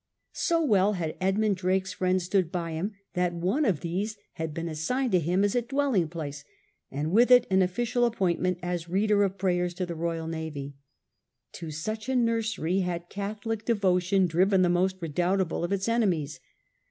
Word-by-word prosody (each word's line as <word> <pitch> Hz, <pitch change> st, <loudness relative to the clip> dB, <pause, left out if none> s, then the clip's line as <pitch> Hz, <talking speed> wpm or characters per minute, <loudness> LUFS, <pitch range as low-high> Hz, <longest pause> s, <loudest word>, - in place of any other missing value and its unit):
So 335 Hz, -2 st, +1 dB
well 205 Hz, -4 st, +3 dB
had 165 Hz, -5 st, -3 dB
Edmund 200 Hz, +1 st, +1 dB
Drake's 190 Hz, +1 st, 0 dB
friends 185 Hz, 0 st, 0 dB
stood 180 Hz, -1 st, +1 dB
by 170 Hz, -3 st, -3 dB
him 175 Hz, +7 st, -3 dB, 0.2 s
that 180 Hz, -1 st, 0 dB
one 190 Hz, -, 0 dB
of 180 Hz, -9 st, +1 dB
these 200 Hz, +6 st, -3 dB, 0.2 s
had 160 Hz, -1 st, -4 dB
been 165 Hz, +2 st, -4 dB
assigned 235 Hz, -, -1 dB
to 180 Hz, -, +4 dB
him 175 Hz, +4 st, +1 dB
as 205 Hz, -, +2 dB
a 245 Hz, -, +2 dB
dwelling 250 Hz, -, +1 dB
place, 150 Hz, -4 st, -6 dB, 0.5 s
and 150 Hz, +3 st, -3 dB
with 235 Hz, +6 st, +5 dB
it 250 Hz, -1 st, +7 dB
an 190 Hz, 0 st, +4 dB
official 240 Hz, +6 st, +1 dB
appointment 185 Hz, -5 st, 0 dB
as 175 Hz, -1 st, -3 dB
Reader 205 Hz, +3 st, +2 dB
of 195 Hz, -1 st, 0 dB
prayers 180 Hz, -2 st, 0 dB
to 185 Hz, -, -2 dB
the 175 Hz, -, -5 dB
Royal 165 Hz, 0 st, -3 dB
Navy. 160 Hz, -4 st, -5 dB, 0.8 s
To 165 Hz, -2 st, -7 dB
such 215 Hz, -, -4 dB
a 265 Hz, -, +1 dB
nursery 225 Hz, -7 st, +1 dB
had 175 Hz, -2 st, -3 dB
Catholic 210 Hz, +2 st, -4 dB
devotion 190 Hz, -4 st, +2 dB
driven 185 Hz, +3 st, +3 dB
the 175 Hz, -, +3 dB
most 185 Hz, +2 st, +1 dB
redoubtable 175 Hz, +2 st, 0 dB
of 175 Hz, -, -2 dB
its 195 Hz, 0 st, -1 dB
enemies. 175 Hz, -, 0 dB
185 Hz, 175 wpm, -27 LUFS, 170-210 Hz, 0.8 s, it